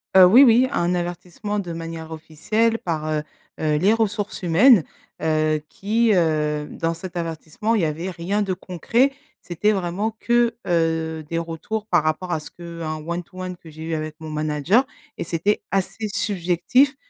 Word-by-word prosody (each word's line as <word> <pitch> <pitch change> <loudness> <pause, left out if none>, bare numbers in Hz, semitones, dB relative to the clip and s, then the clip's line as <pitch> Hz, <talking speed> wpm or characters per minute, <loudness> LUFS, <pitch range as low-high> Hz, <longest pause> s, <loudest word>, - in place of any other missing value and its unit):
Heu, 190 - +10
oui, 230 +10 +8
oui, 245 0 +6
un 175 +1 +1
avertissement 175 +4 -3
de 180 -4 -5
manière 165 -1 -6
officielle 215 +9 0
par, 160 -3 -3
heu 150 -1 0 0.4
heu, 155 -1 +1
les 195 +8 +4
ressources 210 -3 -1
humaines, 185 - +6 0.4
heu, 155 -1 +1
qui, 220 +3 +1
heu 150 -3 +1
dans 165 0 -2
cet 180 +1 -9
avertissement, 165 +6 -2
il 215 - +2
y - - +2
avait 160 +4 -3
rien 185 +4 -2
de 195 -2 0
concret. 190 - +1 0.3
C'était 180 +5 0
vraiment 195 +2 -1
que, 240 -1 +2
heu, 160 -2 0
des 165 - -1
retours 170 +6 -4
par 175 -7 +2
rapport 155 +3 -1
à 160 - 0
ce 150 - -11
qu'un 170 -2 -6
one 170 +1 -2
to 185 +2 -14
one 185 0 -4
que 165 -1 -15
j'ai 155 +1 -10
eu 165 0 -3
avec 155 -1 -3
mon 160 -1 -7
manager 155 - +2 0.3
et - - -1
c'était 170 +5 0
assez 195 +3 -1
subjectif. 200 - +2
175 Hz, 175 wpm, -22 LUFS, 160-205 Hz, 0.4 s, Heu